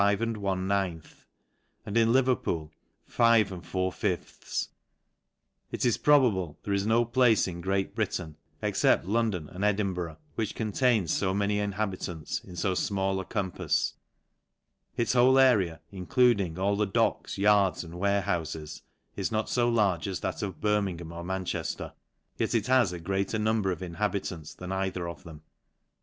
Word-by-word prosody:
and 100 0 +3
in 115 0 -2 1.7
Le~ 130 +2 +5
Wpeolf 85 -11 -1 0.4
Si 95 -4 0 1.1
It - - -4
xs 120 -3 +1
probable, 110 - +3
there 100 - -2
is 100 +1 0
no 115 +2 +3
place 120 -3 +3
in 85 -1 -6
'jreat 95 +1 -1
Britain^ 90 -7 -2 0.3
except - - +2
London 105 -6 0
and 90 +5 -6
Edinburgh^ 95 -5 0 0.2
which 110 -3 -3
:ont2ins 110 - +1
fo 95 -1 0
many 105 0 +1
inhabitants 100 -5 -3
in 90 - -12
fo 95 +2 0
final] 95 0 0
a 95 - -5
compafs. 90 -8 -1 1.0
ts 120 0 +1
whole 130 +2 +5
area, 105 -11 +4
including 100 -2 +2
all 100 +2 +1
the 105 0 +1
docks, 95 - 0
yards, 100 -2 +3
and 85 -1 -10
tfarchoufes, 85 -5 -1 0.3
is 100 +1 -2
not 110 0 -1
fo 120 -1 +2
large 100 -7 +1
as 95 -2 -4
that - - -3
of 95 -5 -4
Birmingham 95 -6 -1
or 85 0 -7
Manchejier; 95 0 -3 0.5
yet - - 0
it 110 -2 +1
has 125 -6 +3
a 90 - -6
greater 95 +5 -1
number 110 -2 +1
of 90 - -5
inhabi 100 +3 -2
:ants 80 -4 -9
than 90 0 -7
either 95 -2 -2
of 85 +2 -8
them. 80 -2 -11
100 Hz, 145 wpm, -28 LUFS, 90-110 Hz, 1.7 s, Le~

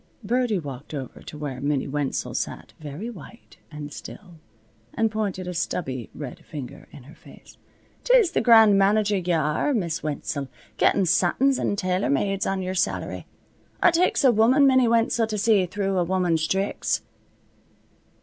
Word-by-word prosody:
Birdie 240 0 +1
walked 145 -2 -7
over 135 -3 -7
to 150 - -10
where 140 -4 -5
Minnie 140 -1 -1
Wenzel 145 -1 -2
sat, - - -5
very 155 +8 -7
white 230 +1 -12
and 150 -2 -8
still, 175 -6 -11 0.6
and 225 -1 +1
pointed 200 -4 -3
a 180 - -4
stubby 130 -8 -3
red 155 +4 -8
finger 145 -7 -9
in 140 - -13
her 145 +5 -14
face. - - -17 0.4
"'Tis - - +4
the - - +1
grand 220 -4 +6
manager 205 +1 +3
ye 180 -1 -2
are, 160 - 0
Miss 170 -7 -2
Wenzel, 145 -1 -4 0.3
gettin' 195 - +3
satins 190 +10 +2
an' - - 0
tailor 185 0 -1
mades 195 +8 0
on 190 -1 -1
yer 185 0 -3
salary. 185 - -2 0.6
It 350 - +6
takes 345 -2 +2
a 260 - +6
woman, 240 +6 +4
Minnie 260 -2 +4
Wenzel, 230 0 +2
to 215 -1 -3
see 205 -3 +3
through 195 0 -1
a - - +2
woman's 175 -3 0
thricks." 195 +1 -1
185 Hz, 160 wpm, -24 LUFS, 155-220 Hz, 0.6 s, grand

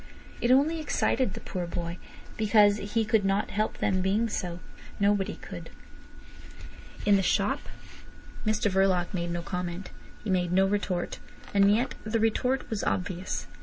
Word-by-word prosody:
It 240 - +1
only 290 +6 +4
excited 260 -7 0
the - - -5
poor 180 -2 -4
boy, 170 0 -4 0.4
because 210 -1 +5
he 215 +2 -1
could 220 -1 +2
not 195 +2 +1
help 215 +1 -1
them 185 -1 +1
being 205 +5 +1
so. 175 -4 -3 0.4
Nobody 200 -1 +2
could. - - -9
It - - -19 0.4
was - - -8
in 205 - +6
the - - +2
shop. 185 - +1 0.8
Mr 215 -1 +1
Verloc 190 -1 +2
made 175 -2 -2
no 170 0 -3
comment. 180 +1 -4 0.3
He 210 - -2
made 180 -2 +1
no 190 +1 +4
retort, 195 -3 -1 0.3
and 200 0 +5
yet 235 +5 +1
the 220 +1 0
retort 250 +4 +1
was 220 -2 -3
obvious. 185 0 -2
200 Hz, 160 wpm, -28 LUFS, 180-220 Hz, 0.8 s, in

